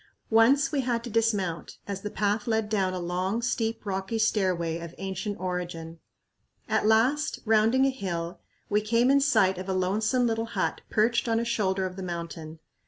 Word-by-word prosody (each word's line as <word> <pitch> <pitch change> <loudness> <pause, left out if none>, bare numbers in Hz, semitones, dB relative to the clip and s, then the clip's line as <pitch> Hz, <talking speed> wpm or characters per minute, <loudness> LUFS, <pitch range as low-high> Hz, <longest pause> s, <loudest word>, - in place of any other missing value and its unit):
Once 270 +5 +5
we 285 - +1
had 240 -2 -1
to 240 - -6
dismount, 205 -7 0
as 200 -1 -4
the 210 - -4
path 205 +2 -1
led 220 -2 0
down 195 -3 +1
a - - -3
long, 180 +5 -1
steep, 230 -2 -2
rocky 195 +2 -2
stairway 185 -6 +1
of 170 0 -8
ancient 195 +1 -4
origin. 175 -3 -4 0.7
At - - +1
last, 255 +7 +3
rounding 225 +4 +4
a 270 - +3
hill, 175 -8 -4 0.3
we 210 +1 +2
came 230 +4 +3
in 280 0 +4
sight 190 -10 +3
of 185 +1 -6
a - - +1
lonesome 210 +7 +1
little 225 -1 0
hut - - 0
perched 230 +2 +2
on 225 0 +2
a 235 - -1
shoulder 195 -5 0
of 185 0 -6
the - - -5
mountain. 170 -3 -6
210 Hz, 180 wpm, -27 LUFS, 185-230 Hz, 0.7 s, Once